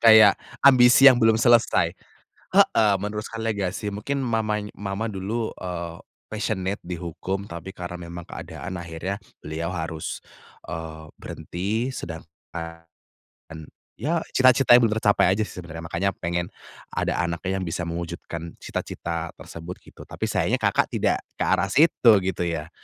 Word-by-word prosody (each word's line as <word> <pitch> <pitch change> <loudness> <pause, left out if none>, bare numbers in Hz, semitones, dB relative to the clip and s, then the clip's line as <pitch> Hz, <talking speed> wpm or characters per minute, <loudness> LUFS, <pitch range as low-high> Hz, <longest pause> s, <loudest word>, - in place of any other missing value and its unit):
Kayak 110 -3 +8 0.2
ambisi 130 0 +7
yang 130 -3 +9
belum 110 -1 +5
selesai, 120 0 +4 0.6
heeh, 105 -2 +5
meneruskan 105 +3 -5
legasi 105 -2 -2
mungkin 105 +8 -3
mama 110 -4 0 0.2
mama 100 +3 -3
dulu, 110 +3 -3
eee, 85 -2 -5 0.2
passionate 100 -3 -2
di 85 -1 -5
hukum 95 +4 -4
tapi 85 +2 -7
karena 90 -2 -7
memang 85 0 -8
keadaan 95 - -7
akhirnya 85 +2 -4 0.2
beliau 80 +3 -4
harus, 80 -3 -4 0.5
eee, 80 -2 -7
berhenti 105 +7 -3
sedangkan 85 -4 -9 1.0
ya 165 +2 0
cita-citanya 130 -1 +6
belum 115 -3 +2
tercapai 105 -4 +3
aja 110 - 0
sih 105 - -6
sebenarnya 85 -2 -8
makanya 85 +4 -1
pengen, 85 0 -2 0.5
ada - - 0
anaknya 90 +2 -1
yang 95 - -3
bisa 85 +2 -3
mewujudkan 85 0 -5
cita-cita 85 -1 -4
tersebut 85 +2 -9
gitu - - -14
tapi - - -12
sayangnya - - +1
Kakak - - +3
tidak - - 0 0.2
ke - - -3
arah 95 - +2
situ 130 0 +5
gitu 90 -2 -1
ya? 80 -1 -3
95 Hz, 135 wpm, -24 LUFS, 85-110 Hz, 1.0 s, yang